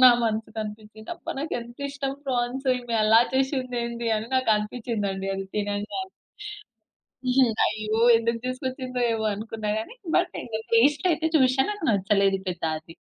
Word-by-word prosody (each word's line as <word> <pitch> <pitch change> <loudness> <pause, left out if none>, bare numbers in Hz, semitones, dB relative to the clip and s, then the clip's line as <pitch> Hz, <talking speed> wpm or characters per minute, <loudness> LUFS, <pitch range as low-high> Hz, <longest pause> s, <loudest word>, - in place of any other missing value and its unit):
నా 255 - +11
మనసుకనిపిచ్చింది, 220 0 -4
"అబ్బా! - - -7
నాకెంతిష్టం 275 0 -4
ప్రాన్స్, 255 +1 -1
ఈమె 240 -1 -4
అలా 220 +2 +6
చేషిందేంది" 250 -3 -1
అని 215 - -4
నాకనిపిచ్చిందండి 210 -4 0
అది 195 - -4
తినంగానే. 205 - -2 1.3
హ్మ్. 250 -4 +5
అయ్యో! 215 +1 -1 0.2
ఎందుకు 230 0 -1
తీసుకొచ్చిందో 255 0 -3
ఏమో 220 -1 -1
అనుకున్నా 215 0 -4
గానీ, 220 - -6 0.2
బట్ 355 0 +2
ఇంగ 220 -2 -4 0.2
టేస్టయితే 305 +6 +3
చూశా, 260 -1 +4
నాకు 410 -5 -5
నచ్చలేదు 195 -1 +2
పెద్దా 170 -2 -2
అది. 165 +1 -15
230 Hz, 125 wpm, -25 LUFS, 215-260 Hz, 1.3 s, నా